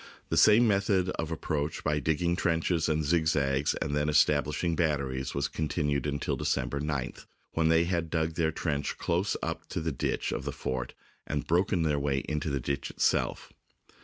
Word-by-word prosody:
The - - 0
same 110 +3 +6
method 100 -3 +2
of 80 -3 -3
approach 80 -2 -2
by 75 -1 +1
digging 80 +4 +1
trenches 85 -2 +1
and 80 0 +1
zigzags 75 -3 +1
and 70 - -2
then 75 +1 +1
establishing 75 +2 +2
batteries 70 -6 -1
was 70 - 0
continued 75 -2 -1
until 70 -1 -1
December 70 - -1
9th, 75 -3 -4 0.2
when 80 -1 +1
they 80 0 +5
had 85 -2 -1
dug 80 0 0
their 80 -1 +1
trench 75 -3 -2
close 90 +4 0
up - - -4
to - - -3
the 80 0 -2
ditch 65 - -2
of - - -3
the - - -3
fort 65 -1 -4 0.3
and - - -2
broken 90 +1 +2
their 75 -2 +1
way 70 -1 0
into 75 0 -2
the 70 -1 -1
ditch 70 +2 -3
itself. - - 0
80 Hz, 175 wpm, -29 LUFS, 70-85 Hz, 0.3 s, same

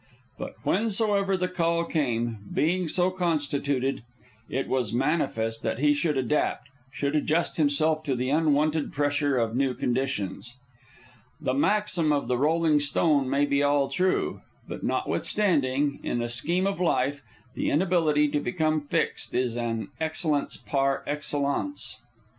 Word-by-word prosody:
But - - -6
whensoever 200 - +1
the 180 0 0
call 170 -2 0
came, 120 -8 -1
being 175 +3 +1
so 180 +3 +1
constituted, 145 -6 -1 0.5
it 135 - -2
was 125 -5 -1
manifest 115 -4 0
that - - -2
he 145 +3 +3
should 150 0 0
adapt, 135 +2 0 0.2
should 140 +1 -2
adjust 155 +3 +1
himself 155 +1 +2
to 135 -4 0
the 130 +2 -1
unwonted 155 0 +2
pressure 145 -1 +1
of 115 -1 0
new 130 -1 +1
conditions. 120 -2 -2 0.8
The 130 - -1
maxim 185 0 +2
of 145 -1 0
the 125 - +1
rolling 155 +1 +3
stone 145 -1 +2
may 140 +2 +2
be 140 0 +1
all 145 -1 +2
true; 185 +7 0 0.3
but - - -7
notwithstanding, 145 -8 0
in - - -2
the 120 0 -2
scheme 170 +11 +1
of 195 -2 -1
life, 145 -4 +1 0.3
the - - -1
inability 155 -3 +2
to 145 - 0
become 155 0 0
fixed 145 - -2
is 125 -2 0
an 115 -2 -3
excellence 160 -2 -1
par 135 -1 0
excellence. 145 - -2
145 Hz, 140 wpm, -26 LUFS, 135-165 Hz, 0.8 s, he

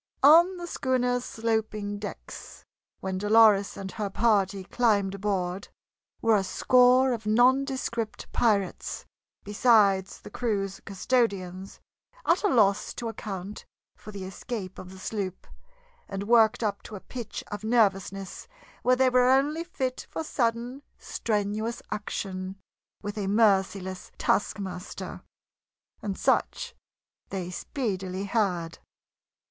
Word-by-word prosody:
On 340 +6 +7
the 350 - -6
schooner's 250 -5 0
sloping 220 -3 -2
decks, 205 - -9 0.4
when 190 -1 -3
Dolores 210 -1 +5
and 190 -1 -6
her 210 -2 -3
party 200 -2 +1
climbed 205 -2 +1
aboard, 195 -2 -2 0.6
were 225 -1 +5
a 200 - +2
score 255 +5 +4
of 220 -2 -5
nondescript 245 -1 +1
pirates, 205 -5 0 0.4
besides 205 -3 +3
the - - -12
crew's 195 -5 -2
custodians, 195 -3 -1 0.5
at - - +3
a - - +4
loss 210 - +2
to 235 -1 -4
account 200 -2 -6 0.3
for 215 - -11
the 200 -2 -7
escape 190 +1 -6
of 180 - -9
the 190 - -11
sloop, 190 -1 -4 0.6
and 195 0 -4
worked 230 +1 +4
up 205 -2 -1
to 215 - -9
a - - -6
pitch 240 +2 -7
of 205 0 -5
nervousness 195 - 0 0.3
where 255 +1 +4
they 260 0 +3
were 250 0 +4
only 290 +5 +2
fit 260 -7 -4
for 320 - -4
sudden, 240 -1 -1 0.2
strenuous 215 +1 -2
action 190 -2 -4 0.5
with 205 +1 -4
a 195 - -2
merciless 195 -3 +1
taskmaster. 190 -3 -2 0.8
And 200 -2 -3
such 485 -1 0 0.6
they 180 -2 -4
speedily 190 -4 -3
had. 190 -6 -1
210 Hz, 120 wpm, -27 LUFS, 195-240 Hz, 0.8 s, On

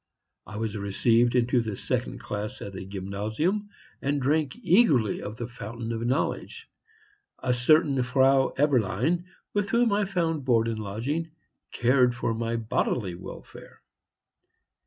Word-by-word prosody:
I 105 +3 -7
was 110 -1 -3
received 115 +4 +2
into 125 0 +3
the 110 -3 -4
second - - -2
class 105 +1 -5
at 100 - -7
the 95 0 -7
gymnasium, 110 - -2 0.3
and 140 +1 0
drank 145 +3 +1
eagerly 155 - +4
of 105 +2 -6
the 120 - -4
fountain 115 -1 -6
of 115 - -3
knowledge; 130 +5 -2 0.7
a 125 - 0
certain 140 +2 +3
Frau 135 +1 +3
Eberlein, 140 - +1 0.3
with 205 -1 0
whom 235 0 +3
I 205 0 +2
found 165 -6 -1
board 115 -3 +3
and 115 -1 -2
lodging, 120 +11 -3 0.4
cared 125 0 +3
for 120 -1 -1
my 115 +1 -2
bodily 110 -3 -1
welfare. 85 - -11
120 Hz, 135 wpm, -27 LUFS, 110-150 Hz, 0.7 s, eagerly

